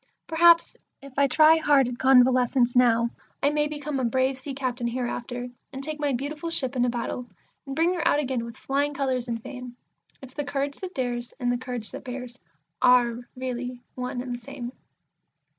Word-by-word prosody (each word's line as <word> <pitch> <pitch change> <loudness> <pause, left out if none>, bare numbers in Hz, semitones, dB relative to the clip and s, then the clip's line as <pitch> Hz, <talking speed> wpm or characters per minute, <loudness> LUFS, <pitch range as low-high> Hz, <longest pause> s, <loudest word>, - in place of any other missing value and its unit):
Perhaps, 335 +1 +5 0.2
if 275 -1 -13
I 280 - +5
try 310 +4 +6
hard 290 -5 +4
at 245 0 -5
Convalescence 250 -1 +4
now, 235 -1 +4 0.3
I 285 - +4
may 295 0 +1
become 295 -2 -4
a - - -1
brave 260 +3 +1
sea 265 +1 -7
captain 250 -3 -2
hereafter, 245 0 -4 0.2
and 270 0 -7
take 305 +1 -4
my 290 -1 +1
beautiful 285 +6 -3
ship 265 -5 0
into 245 -1 +2
battle, 240 +1 -3 0.4
and 270 - -4
bring 335 +4 +3
her 345 - 0
out - - +4
again 260 -5 -1
with 235 -1 -8
flying 285 +1 -1
colours 260 -3 -1
and 230 -1 -2
fame, 250 -2 -8 0.4
If 265 -1 -12
the 290 - -3
courage 280 0 -2
that 370 -1 -7
dares, 245 -2 -3
and 245 -1 +1
the 245 - +1
courage 245 -3 -5
that - - -8
bears, 250 -1 -6 0.4
are 245 -2 +5 0.2
really 250 -1 -4
one 250 0 -4
and 250 -1 -4
the 240 - -5
same. 250 -1 -7
255 Hz, 190 wpm, -26 LUFS, 245-280 Hz, 0.4 s, try